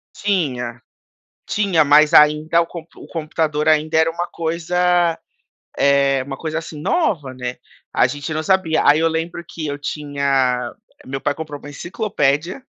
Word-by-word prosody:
Tinha, 125 - -2 0.6
tinha, 195 -7 +2
mas 150 +2 +5
ainda 150 +2 +5
o - - -1
compu 170 -1 -11
o - - -12
computador 155 -1 -2
ainda 155 +1 +3
era 160 +1 +4
uma 170 +2 -3
coisa, 170 +1 0 0.6
eh, 140 -1 +3
uma 135 -1 -6
coisa, 160 0 -4
assim, 160 -2 -9
nova, 160 - 0
né, 125 -1 -5 0.4
a - - +4
gente 145 +4 -5
não 155 - -1
sabia. 185 -3 +2
Aí 150 +2 +6
eu 165 - +3
lembro 165 +1 -3
que 155 -2 -6
eu 145 0 -3
tinha 140 -4 -1 0.3
meu 135 +1 -4
pai 145 +1 -1
comprou 150 -2 -7
uma 145 - -10
enciclopédia, 170 - -1
155 Hz, 155 wpm, -20 LUFS, 140-170 Hz, 0.6 s, Aí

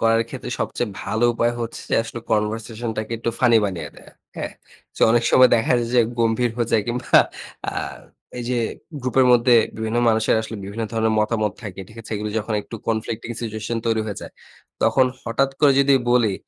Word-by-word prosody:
করার 115 0 +3
ক্ষেত্রে - - -7
সবচেয়ে 120 - -2
ভালো 110 +4 0
উপায় 120 +1 +1
হচ্ছে 115 0 -5
যে, - - +2
আসলে 115 +1 -7
conversation 110 +2 -1
টা - - 0
কে - - -6
একটু 115 0 -1
ফানি 120 -2 +5
বানিয়ে 95 -4 -3
দেয়া, - - -15 0.3
হ্যাঁ? - - -4 0.4
চ - - -10
অনেক 120 0 +3
সময় 130 -1 +7
দেখা 115 - +1
যায় 120 - -2
যে, 125 - +6 0.2
গম্ভীর 115 +1 +2
হয়ে 120 -1 -1
যায় 110 -2 +4
কিংবা 120 +1 +3 0.5
আ - - -8 0.7
এই 120 - -4
যে 125 - +1 0.4
গ্রুপের 130 0 +2
মধ্যে 120 0 +5 0.2
বিভিন্ন 110 +1 -1
মানুষের 110 -1 +3
আসলে 110 0 -6
বিভিন্ন 110 +3 -4
ধরনের 110 -1 +1
মতামত 105 -2 0
থাকে, 95 -3 -7
ঠিক 110 - -16
আছে? 115 - -13
এগুলি 105 +1 -3
যখন 110 0 -3
একটু - - -11
conflicting 115 +1 -2
situation 110 +1 -3
তৈরি 115 -1 +2
হয়ে 100 - -4
যায়, - - -9 0.5
তখন 130 -1 +4 0.2
হঠাৎ 135 +4 0
করে 145 -2 +6
যদি 140 0 +4 0.2
বলি 115 -5 +3
115 Hz, 195 wpm, -22 LUFS, 110-120 Hz, 0.7 s, সময়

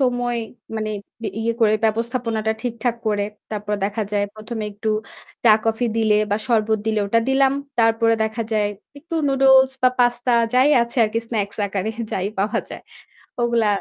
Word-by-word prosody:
সময় 245 -2 +1 0.4
মানে 215 0 -2 0.3
ব - - -7 0.2
ইয়ে 230 +1 0
করে, 215 -2 +5
ব্যবস্থাপনাটা 225 0 0
ঠিকঠাক 235 -1 -2
করে। 205 -1 +1 0.3
তারপর 210 -1 -4
দেখা 210 +2 -1
যায়, 205 -1 +1
প্রথমে 215 +1 -5
একটু 210 +2 -4 0.6
চা-কফি 225 +1 +3
দিলে 220 -2 +3 0.2
বা 205 - +2
শরবত 220 -2 +2
দিলে, 220 -1 +1
ওটা 230 +3 +2
দিলাম। 270 0 +3 0.3
তারপরে 225 0 +3
দেখা 220 +1 -3
যায়, 210 -1 +2 0.3
একটু 330 +3 -8
নুডলস 265 -1 +5
বা 255 - +7
পাস্তা, 245 0 +2 0.2
যাই 255 +3 +5
আছে 235 +2 -7
আরকি 215 +1 -1
স্ন্যাকস 205 -3 -2
আকারে 200 +1 -2 0.2
যাই 190 - -1
পাওয়া 210 +4 +1
যায়। - - -8 0.6
ওগুলা 235 -2 +2
225 Hz, 155 wpm, -21 LUFS, 215-245 Hz, 0.6 s, বা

